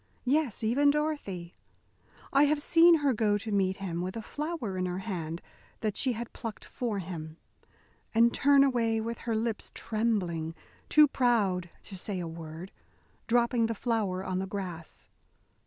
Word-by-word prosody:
Yes, 275 -4 +1
even 270 +6 +3
Dorothy. 285 - -2 0.8
I 280 +2 +6
have 295 +1 +2
seen 335 +3 +6
her 270 - +4
go 210 -2 +2
to 215 +1 -6
meet 190 -2 +1
him 175 -3 -3
with 185 +4 -4
a 225 - -5
flower 300 - -4
in 185 0 -1
her 180 0 -3
hand 175 -5 -4 0.4
that 215 -3 -1
she 260 -2 +2
had 235 +1 -6
plucked 225 -3 -7
for 235 -5 -3
him, 165 -4 -6 0.7
and 235 +1 +4
turn 280 0 +5
away 230 -4 +2
with 230 +1 -4
her 230 -2 -2
lips 225 -1 -2
trembling, 185 -8 -1 0.3
too 300 0 +7
proud 210 -10 +1
to 195 - -8
say 190 +1 -1
a 170 - -4
word, 165 +2 -8 0.6
dropping 235 -1 +3
the 230 - -2
flower 205 -5 -1
on 185 -1 -2
the 190 - -3
grass. 180 -5 -7
220 Hz, 160 wpm, -29 LUFS, 185-245 Hz, 0.8 s, too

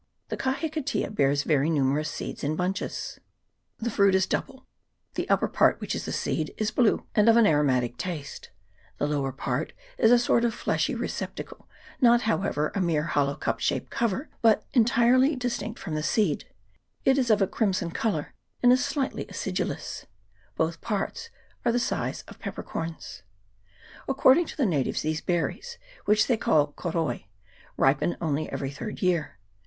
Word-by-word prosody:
The - - -2
kahikatea 280 -3 -2
bears 140 -4 +2
very 150 0 +2
numerous 150 0 +1
seeds - - -6
in 150 +2 0
bunches: 180 +3 -3 0.6
the 235 +1 -3
fruit 200 -2 +4
is 190 0 +3
double; 265 +6 -4 0.5
the - - -3
upper - - +3
part, - - +3
which - - -3
is - - -4
the - - -4
seed, - - -2
is 215 -1 0
blue, 235 -2 +2
and 210 +1 +5
of 230 - +6
an 230 - +6
aromatic 130 - +2
taste; 155 -5 -6 0.5
the - - 0
lower 145 -2 -1
part 135 - -3 0.3
is 225 - +5
a 245 - +7
sort 235 0 +2
of 235 -1 +1
fleshy - - 0
receptacle, - - -5 0.3
not 240 -1 +6
however 195 -8 0
a 200 - -1
mere 165 -4 +1
hollow 145 -3 0
cup - - -2
shaped - - -1
cover, 235 +5 -1
but 225 -2 +4
en 235 -4 +5
tirely 250 +5 +4
distinct 245 -3 -3
from 165 - -5
the 155 - -1
seed: 170 -1 +1 0.6
it 270 +1 +4
is 250 -2 +1
of 215 -2 +5
a 195 - +4
crimson 185 -4 -1
colour, 165 -6 -2 0.3
and 245 - +7
is 255 - +2
slightly 280 -2 -2
acidulous: - - -4 0.5
both 165 +1 -1
parts 210 - -3 0.3
are - - +2
of - - +2
the 245 - +2
size - - -2
of - - -13
pepper - - -6
corns. 165 0 -6 0.9
According 270 +4 +4
to - - -9
the 280 - +2
natives, 150 - 0
these 155 0 -1
berries, 330 - -2 0.3
which 215 +1 +4
they 240 - +2
call 145 -7 +2
koroi, 165 - -2 0.5
ripen 135 +5 +2
only 155 -2 -1
every 135 -1 -3
third 210 +9 -6
year. 175 -4 0
190 Hz, 170 wpm, -27 LUFS, 150-235 Hz, 0.9 s, a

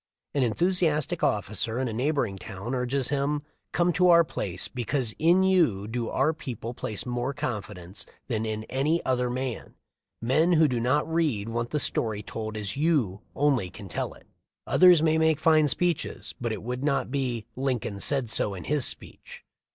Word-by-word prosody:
An 140 - +1
enthusiastic 155 - +2
officer 105 +3 0
in 130 - 0
a 115 - -4
neighboring 120 -5 -1
town 100 +7 -6
urges 130 +1 0
him: 145 +1 0 0.3
"Come 175 0 +2
to 180 +2 +4
our 170 -1 +7
place, 95 - -2
because 125 -1 -2
in 175 +4 +4
you 160 - +2
do 115 +1 -3
our 145 +4 +1
people 120 -6 -6
place 110 -3 -4
more 125 +2 -2
confidence 105 - -5 0.2
than 110 -4 -1
in 110 -1 -3
any 140 +8 0
other 125 -1 +1
man. 130 -1 -4 0.4
Men 155 +9 +2
who 160 -1 +5
do 125 -3 -1
not 130 +5 +1
read 150 -11 0
want 120 +1 -2
the 150 - -1
story 110 -6 0
told 110 +1 -5
as 100 -3 -3
you 140 - +1
only 135 -10 +2
can 100 +2 -10
tell 85 - -4
it. - - -19 0.4
Others 180 -3 +6
may 160 0 +3
make 160 -2 +3
fine 155 -2 +4
speeches, 175 +3 -1
but 120 -1 -1
it 105 -2 -5
would 125 +3 -4
not 140 -3 0
be 125 -5 -2
'Lincoln 125 -6 -2
said 135 +2 +1
so 105 -2 +1
in 90 - -7
his 150 -3 +1
speech.' - - -5
130 Hz, 175 wpm, -27 LUFS, 110-150 Hz, 0.4 s, our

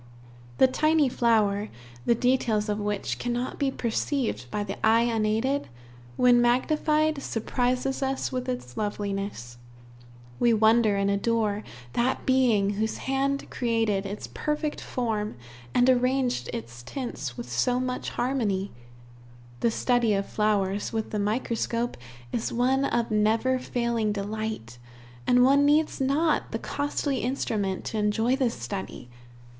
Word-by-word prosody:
The - - +7
tiny 305 +2 +3
flower, 215 -4 +2 0.4
the 235 - +5
details 230 -3 +1
of 210 0 -1
which 205 -1 -2
cannot 245 +1 -2
be 280 -2 +2
perceived 235 - -2
by 210 - -2
the 200 +1 -7
eye 225 +1 +5
unaided, 230 +4 0 0.5
when 245 -1 +5
magnified, 305 +4 +2
surprises 250 +3 -1
us 270 0 -1
with 255 0 -3
its 245 - -5
loveliness. 200 - -4 0.8
We 235 -1 +4
wonder 220 -1 +4
and 200 0 +1
adore 210 0 0 0.3
that 245 +2 0
Being 240 -7 +3
whose 215 +2 -2
hand 275 +1 0
created 225 -5 0
its 205 +2 -5
perfect 300 0 -3
form 220 -4 -2 0.4
and 245 - +3
arranged 255 - +2
its 115 +1 -7
tints 140 - -5
with 120 - -6
so 125 - +1
much 255 0 -2
harmony. 220 -7 -1 0.9
The 235 - +2
study 235 -2 +2
of 195 0 -1
flowers 205 -2 0
with 220 -1 -3
the 210 - -1
microscope 230 +2 -1 0.4
is 225 - -2
one 260 +3 +2
of 235 -3 0
never 220 +5 +2
failing 235 -3 -1
delight, 205 - -4 0.5
and 250 0 +5
one 275 +2 +5
needs 300 0 +2
not 295 +4 +1
the - - -1
costly 285 -1 -2
instrument 215 -7 -1
to 220 - -2
enjoy 220 +4 +2
this 260 -4 0
study. 115 -1 -6
230 Hz, 130 wpm, -26 LUFS, 210-260 Hz, 0.9 s, The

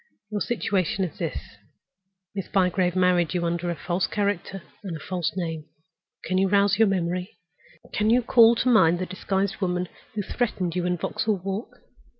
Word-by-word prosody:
Your 205 -1 -2
situation 195 -4 0
is 175 - -5
this. - - -5 0.8
Miss 195 -2 -4
Bygrave 180 -1 +1
has - - +1
married 180 -2 +3
you 175 -1 0
under 170 +1 -1
a 170 - -1
false 175 +2 -1
character 200 -2 -2 0.2
and 175 -5 -4
a - - -12
false 175 0 -2
name. 165 -4 -3 0.6
Can 185 0 0
you 195 - +3
rouse 200 0 +3
your 225 - +6
memory? 180 -1 -2 0.6
Can 215 +1 +1
you 245 +2 +4
call 235 -1 +6
to 235 - -1
mind 175 -9 +5
the 185 - -2
disguised 190 +1 -2
woman 180 -1 -1 0.3
who 205 - -1
threatened 185 -7 -2
you 180 -1 0
in 180 0 0
Vauxhall 210 +4 -1
Walk? 220 +5 -5
185 Hz, 175 wpm, -25 LUFS, 175-205 Hz, 0.8 s, your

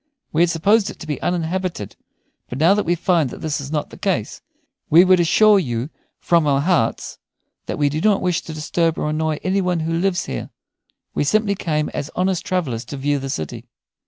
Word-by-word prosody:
We 160 - +2
had 175 - +4
supposed 200 +6 +2
it - - -9
to - - -9
be 150 -4 -4
uninhabited, 175 - -2 0.5
but 125 - -5
now 165 +7 +5
that 205 -3 -1
we 175 - +2
find 170 -4 +1
that - - -10
this 155 -2 -2
is 140 +1 -7
not 150 -2 -2
the - - -12
case, - - -2 0.5
we 170 +4 +7
would 185 -1 +5
assure 205 +5 +5
you 125 -3 -3 0.3
from 170 -3 +2
our 140 -1 +2
hearts 155 -8 0 0.5
that - - -3
we 145 - +2
do 150 +2 -2
not 210 0 +3
wish 180 -3 0
to 160 - -7
disturb 160 +1 0
or 150 - -1
annoy 155 0 -1
any 190 +1 +1
one 180 -3 0
who 165 +1 -2
lives 175 +2 0
here. 60 - -5 0.6
We - - 0
simply 210 +6 +2
came 155 -5 -1
as 145 - -5
honest 185 -1 0
travellers 140 -11 -2
to 140 - -7
view 145 +1 0
the 135 0 -5
city." 80 - -5
165 Hz, 210 wpm, -20 LUFS, 145-180 Hz, 0.6 s, we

